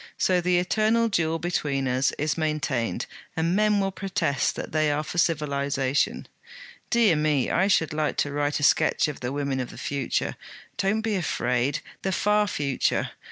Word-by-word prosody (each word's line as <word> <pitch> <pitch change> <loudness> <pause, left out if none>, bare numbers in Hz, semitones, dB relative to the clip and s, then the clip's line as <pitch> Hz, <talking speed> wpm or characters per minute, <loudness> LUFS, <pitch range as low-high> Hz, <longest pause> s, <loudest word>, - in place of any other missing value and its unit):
'So 180 -1 +2
the 180 0 +2
eternal 220 +5 +2
duel 165 -6 0
between 145 -6 -1
us 130 +2 +1
is 155 +1 0
maintained, 150 - -1 0.3
and 165 +2 +1
men 210 0 +3
will 195 0 0
protest 185 - -1
that - - -6
they 155 -1 +2
are 145 +1 -1
for 175 - -3
civilization. 140 -4 0 0.6
Dear 230 -7 +4
me, 150 -3 +1
I 190 +3 +2
should 165 -6 +2
like 150 -1 -1
to 145 - 0
write 145 +1 0
a - - -4
sketch - - +3
of 150 - -5
the 125 0 -3
women 140 -1 -2
of 125 - -3
the - - -11
future 140 -3 -2 0.4
don't 215 +3 0
be 220 -1 -1
afraid! 140 -6 0 0.2
the 190 - -1
far 210 +2 +2
future. 140 -7 -1
155 Hz, 170 wpm, -25 LUFS, 140-190 Hz, 0.6 s, Dear